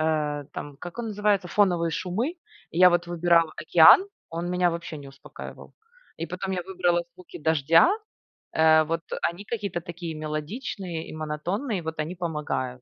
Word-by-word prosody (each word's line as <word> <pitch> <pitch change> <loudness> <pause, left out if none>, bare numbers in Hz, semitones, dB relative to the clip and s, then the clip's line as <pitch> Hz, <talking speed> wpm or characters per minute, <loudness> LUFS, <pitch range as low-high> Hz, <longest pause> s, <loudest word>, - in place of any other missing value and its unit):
э, 150 -2 0
там, 145 -1 -7
как 175 +5 -8
он 235 -1 -3
называется, 205 -3 +1
фоновые 175 -5 +3
шумы. 185 - -1 0.4
И 165 - -4
я 180 0 +9
вот 175 -1 +1
выбирала 170 -1 +3
океан, 165 - +7 0.2
он 170 +1 -3
меня 180 0 +2
вообще 170 -1 -5
не 140 - -10
успокаивал. 135 +1 -11 0.4
И 165 - -4
потом 185 +2 -4
я 180 -1 -2
выбрала 175 -1 +1
звуки 180 -1 -12
дождя. 160 - +4 0.7
Э, 160 0 +6
вот, 165 +1 -1
э, - - -2 0.2
они 185 +4 -10
какие-то 205 -7 -3
такие 170 -1 -7
мелодичные 160 - -5
и - - -8
монотонные. 175 - -3
Вот 160 0 -5
они 155 +4 -3
помогают. 150 -7 -3
170 Hz, 165 wpm, -26 LUFS, 155-180 Hz, 0.7 s, я